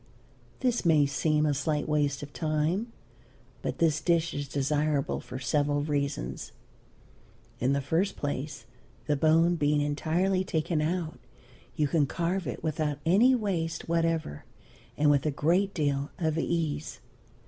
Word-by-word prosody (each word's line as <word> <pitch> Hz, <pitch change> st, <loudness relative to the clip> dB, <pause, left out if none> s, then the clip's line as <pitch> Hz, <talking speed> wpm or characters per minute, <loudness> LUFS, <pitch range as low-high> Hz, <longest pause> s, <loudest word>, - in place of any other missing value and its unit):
This 250 Hz, -2 st, +1 dB
may 155 Hz, -4 st, +5 dB
seem 150 Hz, +2 st, +1 dB
a 150 Hz, -, +2 dB
slight 145 Hz, +1 st, -1 dB
waste 145 Hz, -2 st, 0 dB
of 145 Hz, 0 st, -9 dB
time, 160 Hz, +8 st, -1 dB, 0.7 s
but -, -, -3 dB
this 155 Hz, -2 st, +2 dB
dish 170 Hz, 0 st, +1 dB
is 145 Hz, 0 st, -4 dB
desirable 145 Hz, +1 st, 0 dB
for 125 Hz, -, -8 dB
several 145 Hz, +3 st, 0 dB
reasons. 140 Hz, -, -3 dB, 1.1 s
In 130 Hz, +3 st, +2 dB
the 140 Hz, -, +1 dB
first 165 Hz, +8 st, 0 dB
place, 145 Hz, -3 st, -4 dB, 0.4 s
the 150 Hz, -, +1 dB
bone 165 Hz, +4 st, +3 dB
being 150 Hz, -1 st, +2 dB
entirely 170 Hz, +6 st, +1 dB
taken 160 Hz, -2 st, -1 dB
out 165 Hz, 0 st, -2 dB, 0.6 s
you 150 Hz, -, +1 dB
can 145 Hz, 0 st, +2 dB
carve 175 Hz, +3 st, -2 dB
it 125 Hz, -, -5 dB
without 155 Hz, -2 st, -1 dB
any 220 Hz, +10 st, +5 dB
waste 170 Hz, -8 st, -2 dB
whatever 165 Hz, -, 0 dB, 0.5 s
and 145 Hz, 0 st, +4 dB
with 145 Hz, +1 st, +2 dB
a -, -, +3 dB
great 170 Hz, +7 st, +1 dB
deal 145 Hz, -5 st, -1 dB
of 160 Hz, -4 st, 0 dB
ease. 160 Hz, -3 st, -2 dB
155 Hz, 140 wpm, -28 LUFS, 145-170 Hz, 1.1 s, may